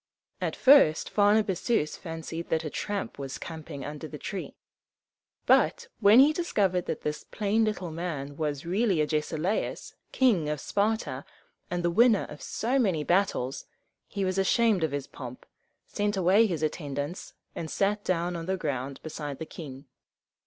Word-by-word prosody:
At - - -1
first 260 - +5
Pharnabazus 205 -4 +2
fancied 165 -1 -6
that 160 0 +1
a 155 - -4
tramp 205 -7 -4
was 135 -1 -5
camping 160 -4 -7
under 150 +1 -6
the 150 - -8
tree; 195 +5 -6 0.9
but 470 - +3
when 210 +3 +7
he 290 +3 +7
discovered 195 - 0
that - - -3
this 150 0 -3
plain 215 +1 0
little 190 -6 -3
man 155 -4 -4
was 145 -1 -3
really 190 0 +1
Agesilaus, 155 +5 -1 0.2
King 205 - +3
of 150 -1 -2
Sparta, 220 - -1 0.5
and 175 0 -2
the 175 - +2
winner 230 +2 +4
of 150 - -10
so 250 +5 -1
many 185 - +1
battles, 175 -8 0 0.4
he 200 -1 -2
was 185 +1 0
ashamed 210 -1 +3
of 160 - +1
his 145 -1 -3
pomp, 125 -2 -9 0.4
sent 205 -1 -1
away 190 +5 +5
his 165 -5 -3
attendants, 145 +1 -4 0.2
and 160 - -5
sat 205 +4 0
down 175 0 0
on 165 0 -5
the 190 0 0
ground 135 -5 -3
beside 150 -3 -5
the 160 - -5
king. 140 -4 -9
175 Hz, 155 wpm, -28 LUFS, 150-205 Hz, 0.9 s, when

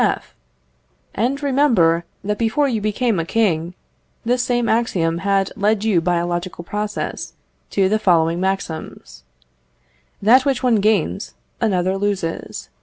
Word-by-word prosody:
F. - - -1 0.8
And, 265 +6 -1
remember, 230 - +3 0.2
that 210 +1 -2
before 235 +6 +2
you 230 -5 -1
became 215 0 0
a - - 0
king, 175 -3 0 0.5
this 245 +1 +2
same 240 -1 0
axiom 175 -8 +1
had 195 0 +1
led 210 +1 +1
you 205 -6 +2
by 175 +1 +1
a 170 - 0
logical 175 0 -4
process 210 +4 -4 0.4
to 195 -2 +2
the 215 +3 +1
following 170 -4 +2
maxims: 170 - -4 1.0
That 240 +6 +5
which 275 -2 0
one 245 -3 +4
gains, 200 - 0 0.3
another 190 -3 +1
loses. 195 -5 -3
200 Hz, 135 wpm, -20 LUFS, 175-230 Hz, 1.0 s, That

